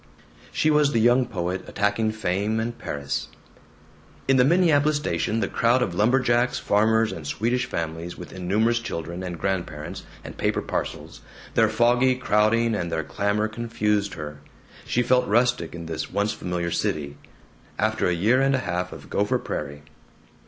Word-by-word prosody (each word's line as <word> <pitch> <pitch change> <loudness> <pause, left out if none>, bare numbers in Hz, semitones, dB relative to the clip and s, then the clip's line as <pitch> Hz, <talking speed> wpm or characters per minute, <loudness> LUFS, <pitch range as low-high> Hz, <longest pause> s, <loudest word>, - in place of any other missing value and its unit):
She 155 - +2
was 150 -1 +3
the 115 - +3
young 120 +2 +4
poet 90 -4 -3
attacking 105 +2 0
fame 105 +1 -1
and 115 +1 -2
Paris. 70 -8 -4 1.0
In 135 0 +4
the 125 - +6
Minneapolis 155 -1 +4
station 110 - -1
the - - +1
crowd 120 +2 +2
of 90 - -3
lumberjacks, 120 +4 +2
farmers, 110 +2 +2
and 75 -3 -7
Swedish 120 - 0
families 85 +1 -4
with 90 - -9
innumerous 105 +6 +1
children 85 -6 -5
and 90 -2 -5
grandparents 85 -5 -3 0.2
and - - -10
paper - - 0
parcels, - - -4 0.3
their - - +4
foggy 125 +2 +3
crowding 115 -1 +2
and 85 -5 -2
their 80 -1 -1
clamor 100 +6 0
confused 105 -3 -1
her. 75 -2 -7 0.5
She 125 - +1
felt 125 +1 +3
rustic 120 -6 +1
in 85 -1 -7
this 80 -1 -4
once 100 +1 0
familiar 90 -1 -3
city, 70 -3 -2 0.6
after 110 +1 +1
a - - +2
year 110 +9 +3
and 135 0 +3
a 130 - -2
half 90 0 -2
of - - -10
Gopher - - +1
Prairie. 75 0 -5
105 Hz, 160 wpm, -24 LUFS, 85-120 Hz, 1.0 s, the